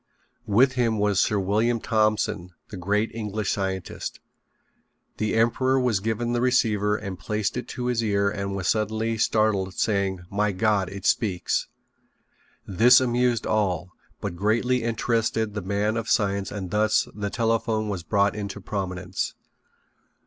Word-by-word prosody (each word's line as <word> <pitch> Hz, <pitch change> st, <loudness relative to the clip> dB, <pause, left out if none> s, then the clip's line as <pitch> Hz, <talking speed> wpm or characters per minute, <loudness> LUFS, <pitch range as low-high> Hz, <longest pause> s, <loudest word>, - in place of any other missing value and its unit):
With 120 Hz, +6 st, +4 dB
him 120 Hz, -4 st, 0 dB
was 105 Hz, -2 st, +2 dB
Sir 105 Hz, -, +2 dB
William 110 Hz, +5 st, +1 dB
Thompson, 105 Hz, -5 st, 0 dB
the -, -, -8 dB
great 105 Hz, +4 st, 0 dB
English 110 Hz, -2 st, -2 dB
scientist. 95 Hz, -3 st, -4 dB, 1.0 s
The 110 Hz, 0 st, -1 dB
emperor 130 Hz, +4 st, +2 dB
was 125 Hz, -6 st, +1 dB
given 115 Hz, +3 st, -1 dB
the 120 Hz, -, 0 dB
receiver 105 Hz, -5 st, +2 dB
and 100 Hz, -4 st, -6 dB
placed 105 Hz, 0 st, -2 dB
it 125 Hz, -, -4 dB
to 125 Hz, -, -5 dB
his 120 Hz, -2 st, 0 dB
ear 100 Hz, -2 st, +1 dB
and 100 Hz, -1 st, -2 dB
was 95 Hz, -3 st, -3 dB
suddenly 110 Hz, +3 st, 0 dB
startled, 105 Hz, -4 st, +1 dB
saying: 100 Hz, -4 st, 0 dB
"My 105 Hz, 0 st, +1 dB
God, 100 Hz, -1 st, +1 dB
it 100 Hz, 0 st, -8 dB
speaks." 95 Hz, -6 st, +1 dB, 1.0 s
This 120 Hz, +6 st, +6 dB
amused 120 Hz, -2 st, +1 dB
all, 95 Hz, -4 st, 0 dB, 0.3 s
but -, -, -4 dB
greatly 120 Hz, +6 st, +1 dB
interested 115 Hz, -1 st, 0 dB
the 105 Hz, -, -3 dB
man 100 Hz, +3 st, -1 dB
of 115 Hz, 0 st, -3 dB
science 100 Hz, -3 st, +1 dB
and 95 Hz, -4 st, -5 dB
thus 105 Hz, +1 st, +2 dB
the 105 Hz, -1 st, -3 dB
telephone 115 Hz, -1 st, 0 dB
was 100 Hz, -4 st, -3 dB
brought 100 Hz, +3 st, +1 dB
into 100 Hz, -1 st, -5 dB
prominence. 95 Hz, -2 st, -4 dB
105 Hz, 145 wpm, -25 LUFS, 100-115 Hz, 1.0 s, This